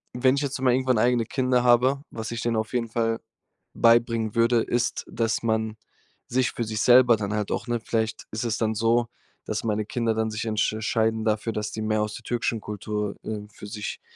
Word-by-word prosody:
wenn 130 Hz, +2 st, +3 dB
ich 140 Hz, -, -1 dB
jetzt 140 Hz, -2 st, -3 dB
mal 130 Hz, -2 st, +4 dB
irgendwann 130 Hz, -2 st, +2 dB
eigene 120 Hz, 0 st, +2 dB
Kinder 125 Hz, 0 st, +1 dB
habe, 125 Hz, +3 st, +4 dB
was 110 Hz, 0 st, -5 dB
ich 115 Hz, -, -3 dB
denen 120 Hz, -1 st, 0 dB
auf 110 Hz, +2 st, -2 dB
jeden 115 Hz, -2 st, -1 dB
Fall 115 Hz, 0 st, 0 dB, 0.5 s
beibringen 115 Hz, -2 st, +3 dB
würde, 115 Hz, 0 st, +4 dB
ist, 120 Hz, 0 st, -1 dB
dass 115 Hz, -1 st, -1 dB
man 110 Hz, -1 st, 0 dB, 0.5 s
sich 125 Hz, +1 st, +1 dB
für 120 Hz, -, -3 dB
sich 110 Hz, -1 st, -3 dB
selber 125 Hz, -1 st, +7 dB
dann 105 Hz, 0 st, -3 dB
halt 105 Hz, -1 st, -2 dB
auch -, -, -2 dB
ne, 120 Hz, 0 st, 0 dB
vielleicht 110 Hz, -1 st, -2 dB
ist 110 Hz, +3 st, -3 dB
es 115 Hz, -1 st, -1 dB
dann 110 Hz, -1 st, 0 dB
so, 115 Hz, +2 st, +2 dB, 0.4 s
dass 110 Hz, 0 st, -3 dB
meine 110 Hz, -2 st, -1 dB
Kinder 115 Hz, 0 st, 0 dB
dann 110 Hz, 0 st, 0 dB
sich 105 Hz, +1 st, -3 dB
entsch 110 Hz, -1 st, 0 dB
scheiden 110 Hz, 0 st, 0 dB
dafür, 110 Hz, +1 st, 0 dB
dass 105 Hz, 0 st, -3 dB
die 110 Hz, -, -5 dB
mehr 110 Hz, 0 st, +1 dB
aus 105 Hz, 0 st, -2 dB
der 120 Hz, -, -10 dB
türkischen 120 Hz, -1 st, -1 dB
Kultur, 105 Hz, 0 st, -4 dB
äh, 105 Hz, -1 st, -5 dB
für 105 Hz, -, -10 dB
sich 105 Hz, 0 st, -5 dB
115 Hz, 210 wpm, -25 LUFS, 110-120 Hz, 0.5 s, selber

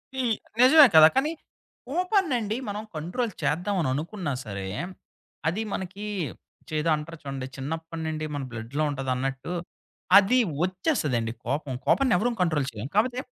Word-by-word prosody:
ఈ 265 Hz, -, -1 dB, 0.4 s
నిజమే 290 Hz, +4 st, +9 dB
కదా! 155 Hz, 0 st, +11 dB
కానీ, 280 Hz, +4 st, +2 dB, 0.6 s
కోపాన్నండి 310 Hz, -, +1 dB
మనం 205 Hz, +1 st, -4 dB
కంట్రోల్ 180 Hz, +10 st, -2 dB
చేద్దామని 165 Hz, +3 st, 0 dB
అనుకున్నా 160 Hz, +2 st, -3 dB
సరే, 100 Hz, -3 st, -5 dB, 0.8 s
అది 180 Hz, +7 st, 0 dB
మనకి 190 Hz, +2 st, -5 dB, 0.6 s
చేదో 155 Hz, +1 st, 0 dB
అంటారు 155 Hz, +2 st, -7 dB
చూడండి. 135 Hz, -2 st, -5 dB
చిన్నప్పటి 160 Hz, +4 st, -5 dB
నుండి 155 Hz, 0 st, -3 dB
మన 145 Hz, -, -3 dB
బ్లడ్‌లో 120 Hz, +6 st, -3 dB
ఉంటదన్నట్టు. 135 Hz, +3 st, -2 dB, 0.6 s
అది 205 Hz, +6 st, +5 dB, 0.3 s
ఒచ్చేస్తదండి 155 Hz, -, 0 dB
కోపం. 140 Hz, +1 st, -2 dB
కోపాన్ని 265 Hz, -7 st, +3 dB
ఎవరం 240 Hz, +6 st, +1 dB
కంట్రోల్ 155 Hz, -6 st, +1 dB
చేయం. 110 Hz, +3 st, -5 dB
కాపోతే 245 Hz, +4 st, +2 dB
165 Hz, 125 wpm, -26 LUFS, 140-220 Hz, 0.8 s, కదా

